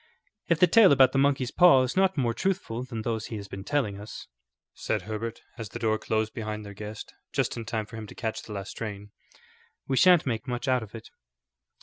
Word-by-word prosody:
"If 170 -2 +2
the 180 - +8
tale 200 +2 +6
about 130 -2 +6
the 135 - +1
monkey's 135 -3 +2
paw 175 -8 +6
is 130 - -3
not 190 -2 +2
more 120 -4 +1
truthful 180 - -2
than 115 -4 -6
those 110 -1 -2
he 115 - -6
has 100 -1 -7
been 100 -1 -8
telling 110 -7 -1
us," 105 - -9 0.5
said - - -2
Herbert, 110 +1 -5 0.2
as 110 -3 -5
the - - -7
door 110 -1 0
closed 110 0 -1
behind 110 -1 -5
their 100 - -8
guest, 105 +2 -8 0.2
just - - 0
in 115 - -6
time 110 -1 -2
for 115 +2 -10
him 110 -1 -7
to - - -12
catch 110 -2 -3
the 105 - -9
last 100 0 -6
train, 105 -2 -7 0.8
"we 135 - 0
sha'nt 180 +3 +6
make 115 -5 -3
much 125 +1 -3
out 130 -1 +2
of 110 0 -10
it." 115 - -10
115 Hz, 225 wpm, -27 LUFS, 110-135 Hz, 0.8 s, the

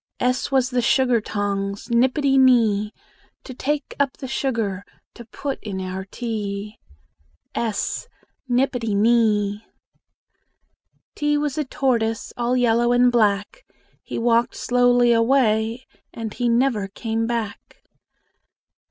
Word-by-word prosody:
S 250 +1 0
was 260 -1 +2
the 250 0 +1
sugar 245 -1 +2
tongs, 200 0 -3
Nippity 265 +3 +2
nee, 225 -6 +4 0.5
To 260 - -9
take 290 +4 -3
up 280 -2 0
the 265 - -7
sugar 230 -7 -2 0.3
To 235 - -11
put 275 +4 -5
in 195 -3 -5
our 185 0 -5
tea. 210 -2 -5 0.7
s 225 - -2 0.4
Nippity 245 -4 0
nee! 210 -1 +2 1.5
T 295 0 0
was 295 -2 -1
a 300 - -1
tortoise, 230 -5 -1
All 240 +1 0
yellow 240 0 +2
and 245 0 +4
black: 210 - +1 0.4
He - - -6
walked 235 0 +2
slowly 245 -1 +3
away, 230 0 +2 0.3
And 225 -2 -6
he 245 -1 -1
never 235 -4 +1
came 225 +3 -3
back. 230 -4 -5
235 Hz, 115 wpm, -22 LUFS, 215-255 Hz, 1.5 s, nee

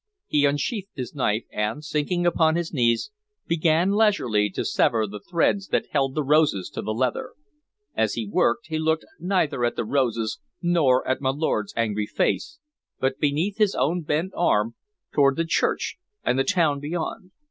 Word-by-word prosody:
He 145 -1 +2
unsheathed 185 - -1
his 125 -3 -5
knife, 115 -6 0
and, 105 +8 -2
sinking 175 +4 -1
upon 160 -2 +3
his 170 -1 -2
knees, 125 - +1 0.3
began 165 +2 +2
leisurely 200 - +2
to - - -4
sever 110 -1 +2
the 105 0 -7
threads 180 - 0
that - - -1
held 135 -2 0
the 155 - 0
roses 145 - +2
to - - -4
the 110 - -3
leather. 125 +3 -1 0.6
As - - 0
he - - -2
worked, 205 +4 +1
he 160 -1 -3
looked 160 0 0
neither 175 -8 0
at 120 - +1
the - - -2
roses 115 -1 0 0.2
nor 160 -8 +2
at 130 +1 0
my 130 - +1
lord's 135 -7 -1
angry 105 -2 0
face, 305 - -1 0.4
but 130 0 0
beneath 160 +9 0
his 210 -2 +3
own 170 +5 +1
bent 160 +4 -1
arm 115 -9 +2 0.4
toward 140 -2 +4
the 165 - 0
church 165 - 0 0.3
and 130 - +1
the - - +4
town 150 -2 +2
beyond. 165 +4 -4
150 Hz, 170 wpm, -24 LUFS, 125-175 Hz, 0.6 s, toward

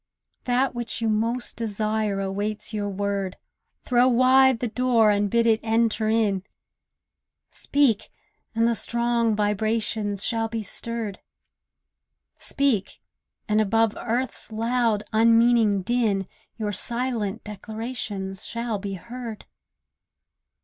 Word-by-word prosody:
That 255 +2 +1
which 240 -1 -2
you 225 -1 0
most 230 +3 -1
desire 215 -2 -1
awaits 205 +3 -3
your 205 -1 -2
word; 200 -1 -2 0.5
Throw 245 0 +4
wide 260 +1 +5
the 245 - -1
door 235 -2 +3
and 205 0 +1
bid 235 +2 +2
it 220 -1 +4
enter 225 -1 +1
in. 215 -4 +2 1.1
Speak, 275 -7 +1 0.5
and 230 +1 +3
the 235 - +2
strong 235 -1 0
vibrations 210 0 0
shall 225 -1 0
be 225 -1 -4
stirred; 225 -2 -4 1.2
Speak, 275 -8 0 0.5
and 215 0 +3
above 225 +1 +2
earth's 245 0 -3
loud, 230 -1 +1
unmeaning 225 -2 +4
din 215 -4 +1 0.3
Your 215 -2 -2
silent 235 -1 -2
declarations 210 -3 -5
shall 230 -2 -3
be 200 0 -5
heard. 235 +2 -8
225 Hz, 110 wpm, -25 LUFS, 210-235 Hz, 1.2 s, wide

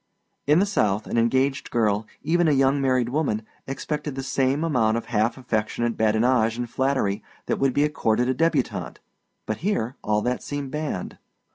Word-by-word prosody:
In 150 +2 +5
the 195 - +4
South 105 - +1
an 115 - 0
engaged 130 +4 +1
girl, 110 -2 +1 0.2
even 170 +2 +2
a - - +4
young 135 +1 +3
married 130 -3 +2
woman, 125 -6 0 0.2
expected 150 +1 -4
the 135 - -4
same 135 +2 +1
amount 115 -8 +2
of 115 - -4
half 110 +4 +2
affectionate 120 -1 -1
badinage 110 +1 +2
and 120 0 -3
flattery 130 -5 0 0.2
that - - -1
would 135 -1 +3
be 145 - +4
accorded 125 -5 +1
a 130 - +2
débutante, 165 +5 0 0.5
but 110 - -2
here 135 - -1
all 105 0 +1
that 125 0 -1
seemed 145 -2 -5
banned. 150 - -4
130 Hz, 170 wpm, -24 LUFS, 110-145 Hz, 0.5 s, In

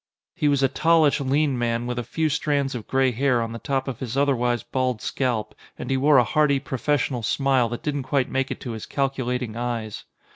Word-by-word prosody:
He 150 - 0
was 140 -2 +2
a - - +6
tallish, 155 +1 +3
lean 140 -1 +1
man 120 0 -1
with 120 0 -3
a - - -3
few 160 +5 -1
strands 145 -2 0
of 120 -4 -6
gray 130 -1 +2
hair 125 +1 +1
on 115 -1 -2
the 115 - -6
top 135 +1 -2
of 130 -4 -4
his 130 0 -4
otherwise 125 -5 +1
bald 130 -3 -1
scalp, 115 -3 -2 0.2
and - - -5
he - - +2
wore 140 +2 +4
a 125 - +6
hearty, 140 +3 +2
professional 130 -1 -1
smile 130 +2 +1
that 120 - -6
didn't 145 -2 -1
quite 135 -2 +2
make 135 0 -1
it - - -5
to 125 - -5
his 110 -2 -7
calculating 125 -4 -2
eyes. 115 -3 -4
130 Hz, 215 wpm, -24 LUFS, 120-140 Hz, 0.2 s, a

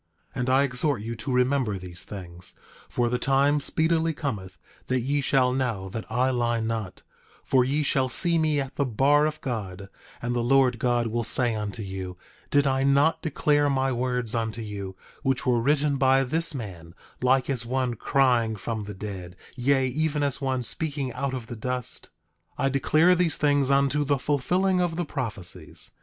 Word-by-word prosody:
10:27 - - -7
And 125 +1 0
I 135 +2 +4
exhort 130 -2 0
you 115 +1 -4
to 130 +4 -5
remember 125 -4 +1
these 90 -1 -9
things; 90 -3 -7 0.3
for 120 -1 0
the 125 +1 -1
time 140 +3 +3
speedily 160 +2 +1
cometh 100 - -4 0.3
that 130 -1 +1
ye 140 +4 0
shall 130 -2 +2
know 115 -8 -2
that 110 +2 -7
I 125 +3 +2
lie 120 -2 0
not, 110 -4 -4 0.4
for 130 -1 +3
ye 140 +4 0
shall 135 -2 +1
see 170 +4 +4
me 155 -2 +2
at 135 0 -5
the 140 - +2
bar 145 +6 +3
of 155 0 -5
God; 100 -6 -5 0.3
and 120 +1 -2
the - - +1
Lord 125 0 +3
God 120 -1 +1
will 115 +1 -1
say 120 +1 +1
unto 105 0 -4
you: 95 -2 -6 0.3
Did 145 0 +3
I 135 -1 +1
not 140 +4 +3
declare 145 -1 +1
my 135 -1 +1
words 125 -2 -1
unto 115 -1 -2
you, 100 -3 -6 0.3
which 135 -2 0
were 120 -2 +2
written 145 +2 +2
by 135 0 +4
this 160 +4 0
man, 90 -8 -8 0.3
like 130 +1 +3
as 130 -4 +1
one 125 +1 -1
crying 120 -2 +2
from 110 +1 -4
the 105 -1 -7
dead, 95 -3 -7 0.2
yea, 135 +1 +2
even 150 +3 0
as 140 0 -1
one 130 -2 -1
speaking 140 -1 -2
out 135 +2 -2
of 125 -3 -6
the 120 - -7
dust? 125 +2 -2 0.5
10:28 - - 0
I - - +3
declare 155 +6 +4
these 175 -2 +1
things 145 -2 +2
unto 140 +1 +3
the 140 0 +1
fulfilling 180 +8 +1
of 175 -2 0
the 175 0 -2
prophecies. 95 - -5
130 Hz, 185 wpm, -26 LUFS, 115-140 Hz, 0.5 s, I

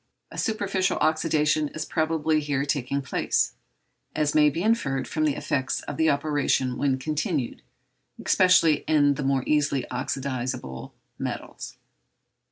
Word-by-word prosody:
A - - -10
superficial 195 -3 0
oxydation 155 -1 +1
is 155 - -3
probably 160 -1 +1
here 145 -2 -1
taking 140 -1 -1
place, - - 0 0.6
as 150 -1 +1
may 150 -1 +5
be 165 +5 -3
inferred 140 - 0
from 155 -1 0
the 150 - +1
effects 130 -1 -1
of - - -7
the 160 0 +3
operation 140 -3 +1
when 135 0 +1
continued, 150 - -2 0.6
especially 180 -5 +5
in 145 -2 +4
the 145 - -5
more 135 -1 +1
easily 150 -3 +1
oxydizable 125 - -4 0.3
metals. - - -6
150 Hz, 130 wpm, -25 LUFS, 135-155 Hz, 0.6 s, may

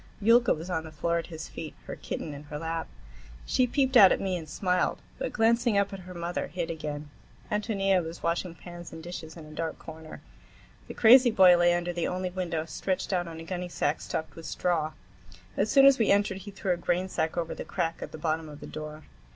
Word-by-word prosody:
Yulka 235 +3 +5
was 160 +3 -2
on 160 -2 -1
the 160 - -9
floor 170 +2 0
at 165 - -6
his 160 -2 -7
feet, 160 -2 -8
her - - -6
kitten 155 - -5
in 140 - -8
her 150 0 -6
lap. 165 +1 -3 0.6
She 255 - +2
peeped 265 +1 +1
out 195 -6 +9
at - - +2
me 190 -2 -1
and 160 -3 -6
smiled, 180 +3 0 0.2
but, - - -2
glancing 230 -1 +3
up 200 0 +1
at 195 - -6
her 180 0 -10
mother, 170 +1 -3
hid 175 -2 -3
again. 150 -2 -5 0.4
Ántonia 195 -3 +1
was 165 +1 -8
washing 170 +1 -1
pans 175 0 -10
and 160 0 -9
dishes 170 -1 -7
in 160 - -10
a 155 - -12
dark 160 +1 -4
corner. 160 0 -10 0.7
The - - -8
crazy 245 +2 +8
boy 190 -5 +7
lay 175 0 +4
under 175 0 -2
the 170 -1 -1
only 185 0 -2
window, 170 -3 -2
stretched 185 +3 -2
on 175 -1 0
a 165 0 -8
gunnysack 175 -3 -2
stuffed 160 -2 -4
with 165 -1 -8
straw. 160 -3 0 0.6
As 205 - +1
soon 275 -1 +7
as 275 -2 +7
we 225 - +3
entered 200 -1 +2
he 205 - -9
threw 195 -1 -3
a - - -3
grainsack 175 -1 -1
over 165 -1 -1
the - - -6
crack 165 -3 -2
at - - -6
the - - -7
bottom 155 0 -2
of 150 -1 -10
the - - -9
door. 155 0 -7
175 Hz, 220 wpm, -28 LUFS, 160-195 Hz, 0.7 s, out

